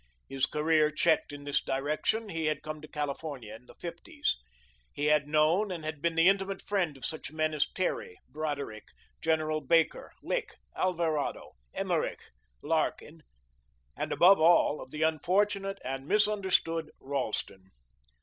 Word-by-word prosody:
His 135 +1 0
career 155 0 +3
checked 155 -1 +2
in 145 0 -8
this 145 -1 0
direction, 150 +11 -1
he 165 -3 -2
had 150 -1 -1
come 155 -1 -6
to 155 - -10
California 145 -6 -4
in 120 +3 -13
the - - -15
fifties. 170 - -3 0.6
He 145 - -3
had 150 -1 +3
known 155 +7 +3
and 165 -4 -5
had 155 -2 -4
been 170 0 0
the 165 +2 +5
intimate 195 0 +1
friend 180 -8 -1
of 130 - -6
such 160 -3 -4
men 155 0 0
as 150 -1 +1
Terry, 180 - -2
Broderick, 140 -7 -4 0.4
General 155 -1 +1
Baker, 165 0 +2
Lick, 480 -3 -2 0.2
Alvarado, 165 -5 -1 0.2
Emerich, - - -1 0.4
Larkin, 160 0 -1 0.7
and, - - -3
above 190 +2 +6
all, 165 -2 +5
of 130 - -9
the 150 +3 -2
unfortunate 195 +5 +1
and 135 +2 -4
misunderstood 190 -5 +2
Ralston. 110 -8 -3
155 Hz, 145 wpm, -30 LUFS, 145-170 Hz, 0.7 s, above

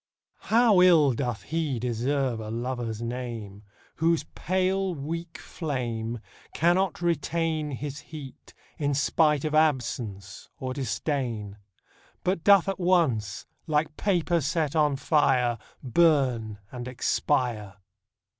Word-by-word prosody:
HOW 220 -4 +5
ill 160 -7 +6
doth 125 +3 -4
lie 155 -6 0
deserve 125 +1 -1
a 110 -1 -6
Lover's 120 -1 -3
name 115 -4 -5 0.4
Whose 165 0 +2
pale 185 +1 0
weak 165 +3 -5
flame 120 - -4 0.3
Cannot 175 +3 +2
retain 165 -1 0
His 145 +1 -5
heat, 145 -2 -11 0.2
in 145 -2 0
spite 150 +1 +2
of 155 - -2
absence 120 - -1
or 130 -1 -3
disdain; 120 -5 -3 0.7
But 180 -3 0
doth 200 -3 +6
at 195 0 -2
once, 155 - +1 0.2
like 150 0 0
paper 175 -4 +1
set 155 +1 -1
on 150 -2 +3
fire, 130 -5 +2 0.2
Burn 130 -6 +2
and 125 -1 -6
expire 120 -4 -1
140 Hz, 110 wpm, -27 LUFS, 120-165 Hz, 0.7 s, ill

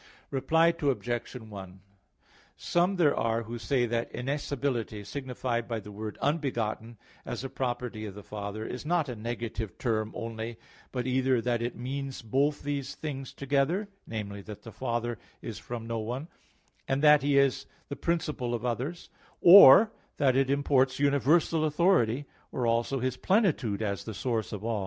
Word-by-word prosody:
Reply 165 +5 +3
Obj. 120 -4 -1
1: 100 -5 -9 0.8
Some 175 +3 +1
there 160 -6 +3
are 115 0 0
who 115 +2 -6
say 125 +1 +1
that 115 0 -2
innascibility, 130 -5 -2
signified 125 -1 -3
by 115 -2 -2
the 105 0 -10
word 105 +1 -6
"unbegotten," 120 -7 -1 0.3
as - - -5
a 135 - -4
property 120 -4 -3
of 100 - -9
the 105 - -9
Father, 105 +1 -5
is 125 - -5
not 160 -2 +1
a 125 - -4
negative 115 -2 -5
term 110 -3 -1
only, 115 0 -5 0.3
but 125 -2 -2
either 130 -1 +2
that 120 -1 0
it 120 0 -2
means 135 +1 -5
both 140 +6 +1
these 140 -1 -3
things 135 -4 -5
together 145 +9 0 0.2
namely, 100 -2 -5
that 105 0 -10
the 115 - -9
Father 120 -1 -2 0.2
is 115 -3 -7
from 120 -2 -6
no 115 0 -2
one, 125 +7 -4 0.6
and 135 +2 0
that 150 -1 +7
He 140 0 +2
is 140 -2 +2 0.2
the 140 - -5
principle 150 -8 -1
of 120 +1 -5
others; 130 +8 -3 0.3
or 195 +3 +10 0.3
that 130 -3 +3
it 135 0 +2
imports 135 -2 +2
universal 145 +3 +3
authority, 150 - +2 0.3
or 125 - -1
also 115 +4 +1
His 130 0 -1
plenitude 150 - +1
as 100 -2 -2
the 110 - -7
source 115 -3 -2
of 105 -1 -6
all. 115 -2 0
125 Hz, 160 wpm, -29 LUFS, 115-140 Hz, 0.8 s, or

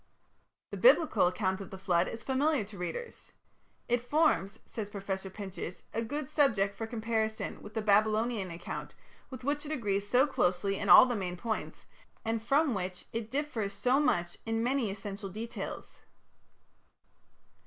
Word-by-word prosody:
The - - -4
Biblical 325 - +5
account 185 +1 -1
of 195 - -8
the 190 - -8
flood 180 -2 +2
is 230 - -6
familiar 275 -1 +1
to 200 0 -11
readers. 475 - -6 0.5
"It 245 0 +2
forms", 245 -6 +2
says 210 -3 -5
Professor 195 -1 -4
Pinches, 190 -3 -7
"a 225 - 0
good 290 +5 -3
subject 215 -11 +2
for 225 +2 -5
comparison 220 -1 -2
with 210 - -11
the 220 - -1
Babylonian 215 0 +2
account, 170 +1 -6 0.3
with 255 -2 -9
which 290 +2 -1
it 300 - -6
agrees 205 -8 -1
so 255 +2 +5
closely 195 -6 0
in 200 - -2
all - - +11
the 245 -2 -1
main 180 -3 -3
points, 220 +3 -4 0.4
and 225 0 0
from 275 +4 +2
which 185 -2 -4
it 225 -1 -3
differs 250 -7 -2
so 250 +7 +2
much 175 - 0
in 225 0 -1
many 250 -2 +1
essential 195 0 -6
details." 220 +5 -6
220 Hz, 155 wpm, -31 LUFS, 195-250 Hz, 0.5 s, all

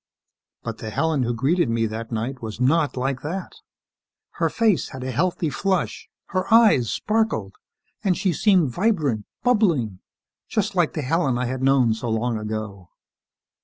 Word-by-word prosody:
But - - -5
the 110 - -5
Helen 160 +4 0
who 120 -1 0
greeted 145 +5 +1
me 115 0 +1
that 115 +1 -5
night 120 +4 -3
was 110 -1 -6
not 145 +3 +2
like 130 0 -1
that. 180 +5 -5 0.9
Her - - +2
face 220 -6 +1
had 130 -1 -7
a 130 - -3
healthy 170 +3 0
flush, 190 +2 -1 0.2
her 185 +1 -2
eyes 215 - +5
sparkled 215 - 0 0.5
and 190 -4 +2
she 185 -4 +1
seemed 180 - +3
vibrant, 150 - 0 0.2
bubbling... 170 - +2 0.5
just 210 -2 0
like 175 -4 +1
the 155 - -3
Helen 135 -2 +1
I 125 - -1
had 130 +1 -3
known 130 -4 +4
so 115 +2 -4
long 115 0 0
ago. 105 -4 -5
135 Hz, 160 wpm, -23 LUFS, 115-180 Hz, 0.9 s, eyes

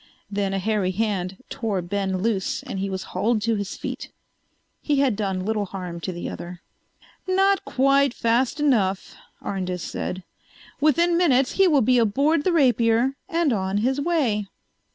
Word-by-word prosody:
Then 200 -1 -1
a 195 - -1
hairy 205 -1 0
hand 190 0 -2
tore 215 -5 -2
Ben 190 0 -2
loose 215 -5 -1
and 195 - -5
he 195 +1 -2
was 190 0 -4
hauled 215 +5 +1
to 230 +1 +1
his 200 -3 -3
feet. - - -6 0.7
He 295 - 0
had 270 -5 +2
done 190 -3 -2
little 215 -1 0
harm 180 -3 -6
to 175 - -4
the 175 -1 -5
other. 175 0 -8 0.6
"Not 390 +1 +3
quite 275 0 +3
fast 235 +5 +1
enough," 210 -10 +1 0.3
Arndis 185 -2 -3
said. 185 0 -4 0.6
"Within 335 +4 +3
minutes 270 -7 +3
he 390 -1 +4
will 290 -7 +4
be 250 +2 +4
aboard 280 +8 +2
the 370 - +3
Rapier 245 -4 +3 0.2
and 335 -6 +1
on 190 -1 -1
his 265 +2 +1
way." 270 -11 0
225 Hz, 160 wpm, -24 LUFS, 190-275 Hz, 0.7 s, he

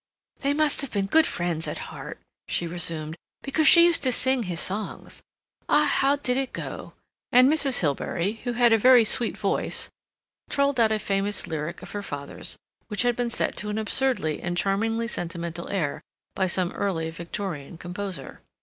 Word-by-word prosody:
"They 280 +1 0
must 305 -2 +2
have 275 - -4
been 200 -2 0
good 315 +11 +4
friends 170 -2 -2
at - - -5
heart," - - -8 0.3
she 175 - -1
resumed, 165 -2 -3 0.3
"because 305 +3 +2
she 340 -1 +9
used 345 -1 +3
to 260 - +3
sing 260 +1 +2
his 180 -6 -3
songs. 200 +2 -4 0.5
Ah, 300 - +4
how 280 -1 +3
did 260 -3 -1
it 270 -1 -1
go?" - - -6 0.4
and 250 +1 +7
Mrs. 280 -3 +2
Hilbery, 170 +7 -1
who 245 - -2
had 240 -1 +4
a 225 - +4
very 250 +1 +7
sweet 230 +2 +1
voice, 200 -2 -1 0.6
trolled 280 -2 +1
out 225 -1 +4
a 215 - +2
famous 200 -1 -1
lyric 160 +1 -5
of - - -9
her 205 - -4
father's 145 -7 -6 0.3
which 210 +1 +1
had 245 -1 +2
been 245 0 -1
set - - -1
to 210 - -1
an 210 - -2
absurdly 220 - 0
and 175 0 -3
charmingly 225 +5 0
sentimental 170 -5 -4
air 165 -8 -2 0.3
by 190 - 0
some 180 0 +2
early 165 -5 -2
Victorian 170 -2 -6
composer. 180 -4 -6
205 Hz, 175 wpm, -25 LUFS, 175-250 Hz, 0.6 s, she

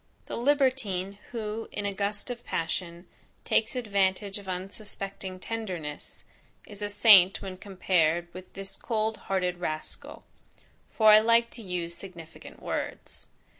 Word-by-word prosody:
The - - -5
libertine 240 -8 +1
who 225 -1 -4
in 205 - -3
a 200 - -1
gust 205 +4 -2
of 240 -1 -7
passion, 170 +1 -3 0.4
takes 220 +3 +2
advantage 200 -3 +1
of 200 - -13
unsuspecting 195 0 -5
tenderness, 185 -9 -5 0.4
is 205 -1 -11
a 205 - -2
saint 200 -3 +7
when 190 -1 -5
compared 175 -3 +1
with 185 +1 -10
this 195 0 -6
cold 220 -1 -1
hearted 180 -2 0
rascal; 155 -3 -5 0.7
for 220 -1 +6
I 210 - +10
like 230 +1 +4
to 235 - -3
use 180 -4 -3
significant 170 -3 -11
words. - - -5
195 Hz, 130 wpm, -28 LUFS, 180-215 Hz, 0.7 s, I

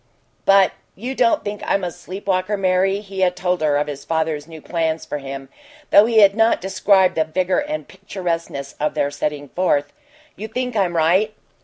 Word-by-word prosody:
"But 195 -1 +5 0.2
you 245 +6 -5
don't 240 -3 +2
think 205 0 -5
I'm 195 - 0
a 175 - -2
sleep 190 +4 -9
walker, 190 +1 0
Mary?" 190 +1 +1
He 195 -2 -8
had 180 -1 +2
told 180 -2 -1
her 150 -2 +2
of 145 - +1
his 145 -2 -7
father's 160 -1 -2
new 160 -1 -10
plans 160 0 -2
for 150 - -4
him, 135 0 -7 0.4
though 205 +2 +7
he 225 -2 +5
had 200 -1 +7
not 225 0 +3
described 190 0 +3
the 160 - +2
vigor 180 - 0
and 300 +1 -4
picturesqueness 170 -7 -5
of 150 - -1
their 140 - 0
setting 145 0 -3
forth. 145 -6 0 0.4
"You 215 - -6
think 250 +2 -3
I'm 185 -4 +1
right?" 185 +7 +2
185 Hz, 190 wpm, -20 LUFS, 155-200 Hz, 0.4 s, though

